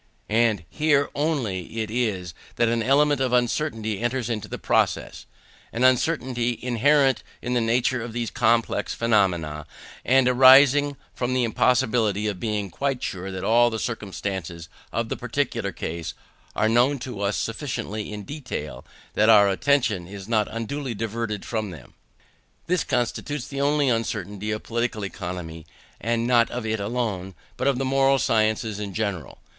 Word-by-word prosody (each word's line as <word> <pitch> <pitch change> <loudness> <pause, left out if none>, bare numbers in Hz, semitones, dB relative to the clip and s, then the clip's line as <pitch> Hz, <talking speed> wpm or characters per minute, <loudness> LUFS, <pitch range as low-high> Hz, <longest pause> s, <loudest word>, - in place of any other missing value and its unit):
And 110 -5 +2
here 145 - +1
only 120 - -2
it 110 - -7
is 105 -8 -1 0.2
that 120 - +2
an 115 0 +1
element 145 +3 +3
of 130 -2 0
uncertainty 115 -4 0
enters 120 0 -1
into 105 -2 -3
the - - -5
process - - 0 0.4
an 120 - -2
uncertainty 125 -2 +2
inherent 135 +3 +3 0.2
in 125 - -3
the 120 - +2
nature 120 +2 +1
of 115 0 -6
these 120 0 -3
complex 115 -2 +1
phenomena, 85 -10 +1 0.4
and 130 0 +4
arising 135 +3 +6 0.2
from 125 0 -2
the 130 - +2
impossibility 115 -3 +2
of 100 -4 -2
being 105 -3 -2
quite 135 +4 -2
sure 95 +1 -4
that 95 -1 -5
all 120 +1 +4
the 110 - -3
circumstances 95 -7 -5 0.2
of - - -2
the - - -1
particular - - -2
case 80 0 -5 0.4
are 110 - +2
known 120 +5 +3
to 120 -5 -7
us 100 0 0
sufficiently 115 -4 -4
in 105 -1 -6
detail, 125 - -6
and 70 - -15 0.4
that 110 - +5
our 100 -2 +7
attention 110 -4 +1
is 100 0 -9
not 110 -2 +1
unduly 120 +3 -4
diverted 110 -1 -3
from 110 -2 -2
any 90 - -7
of - - -10
them. - - -28 0.7
This 180 -1 +1
constitutes 130 +2 -2
the 140 0 -4
only 145 0 +2
uncertainty 105 -3 -2
of 105 0 -3
Political 115 -3 -2
Economy; 85 -4 -6 0.3
and 115 +1 0
not 120 -1 +4
of 120 -2 -5
it 110 0 -1
alone, 100 -4 -3 0.2
but - - -1
of 140 -3 +2
the 135 - -1
moral 135 +1 +3
sciences 110 -2 +1
in 100 -2 -5
general. 100 -8 -3
115 Hz, 160 wpm, -24 LUFS, 105-130 Hz, 0.7 s, our